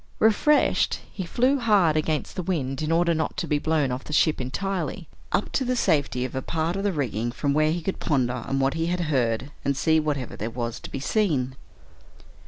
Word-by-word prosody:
Refreshed, 225 +8 +3 0.2
he 185 -3 -5
flew 260 +7 +2
hard 200 -9 +3
against 155 0 -1
the 185 - -2
wind 145 -7 -2
in 155 +1 -1
order 170 +1 +3
not 160 0 -2
to - - -1
be 150 -1 +1
blown 155 -4 +1
off 125 +2 -4
the - - -9
ship 150 -2 +3
entirely, 190 +9 -3 0.2
up - - 0
to 270 - 0
the 255 0 0
safety 145 - +1
of 130 - -6
a 130 - -2
part 165 +4 -1
of 195 - -2
the 205 - +2
rigging 120 - -2
from 140 +3 -1
where 155 +1 +3
he 170 0 -2
could 195 - -3
ponder 130 -5 +1
on 125 +2 -3
what 135 0 +2
he 165 0 -1
had 180 +1 -1
heard, 130 -4 0
and 140 -1 0
see 160 +2 +3
whatever 145 -5 -2
there 110 - -4
was 120 -1 -4
to - - -9
be - - -5
seen. 140 - 0
155 Hz, 215 wpm, -25 LUFS, 130-175 Hz, 0.2 s, Refreshed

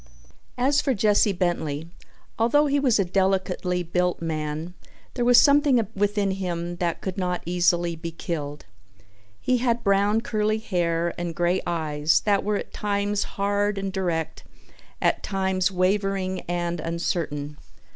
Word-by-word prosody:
As 275 +4 +3
for 270 -3 0
Jesse 210 0 +3
Bentley—although 175 - -1
he 285 0 +2
was 255 -5 +3
a 195 - +2
delicately 185 -1 0
built 180 +1 0
man 155 +1 -3 0.4
there 245 - -1
was 245 0 +7
something 280 -5 +4
within 205 0 +1
him 175 -2 -3
that 170 -2 -2
could 190 0 -4
not 180 -1 -2
easily 175 -1 +1
be 165 +1 -6
killed. 150 -3 -5 0.7
He 255 - +1
had 235 -1 0
brown 200 +2 +3
curly 215 -1 0
hair 170 -5 -1
and 170 -1 -4
grey 175 +2 +1
eyes 155 -2 +1
that 200 -2 +1
were 210 0 0
at - - -7
times 205 0 -1
hard 205 +1 +1
and 195 -1 -3
direct, 175 -5 -2 0.6
at - - +1
times 190 -1 0
wavering 190 0 0
and 175 -1 -1
uncertain. 155 -3 -3
185 Hz, 135 wpm, -25 LUFS, 170-205 Hz, 0.7 s, was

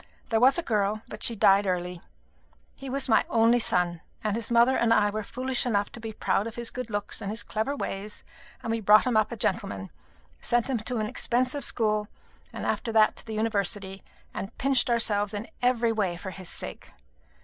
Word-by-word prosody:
There 225 - +2
was 260 +6 +5
a 345 - 0
girl, 210 -2 0
but - - -9
she 235 - +6
died 195 0 +4
early. 180 -1 -2 0.7
He 270 - -8
was 275 +2 -2
my 225 - +4
only 230 +1 +4
son, 175 -6 +1 0.2
and 215 -1 0
his 230 -2 -2
mother 240 +2 +4
and 235 -1 +2
I 210 -2 +4
were 215 +1 -3
foolish 255 +4 -2
enough 205 -4 0
to - - -8
be 225 -1 -6
proud 210 0 0
of 230 - -8
his 235 -1 -2
good 250 -2 -6
looks 205 -1 -4
and 200 - -4
his 220 +2 -3
clever 220 +7 -2
ways; 210 -5 -5 0.4
and 225 - -2
we 230 - 0
brought 215 +2 +6
him 250 -3 0
up 215 +1 +2
a - - -3
gentleman, 100 - -2 0.5
sent 240 +2 0
him 255 - +1
to 235 +3 -2
an 215 - 0
expensive 250 +5 0
school, 215 -2 +1 0.4
and - - -6
after 230 - -1
that 220 -1 +4
to - - -9
the 220 - -4
University, 200 -3 -1 0.3
and 200 +4 -6
pinched 270 -2 +1
ourselves 210 -3 +1
in 205 +2 -5
every 245 -2 +2
way 195 -6 -1
for 190 +2 -7
his 185 -1 -8
sake. - - -5
220 Hz, 205 wpm, -27 LUFS, 205-235 Hz, 0.7 s, she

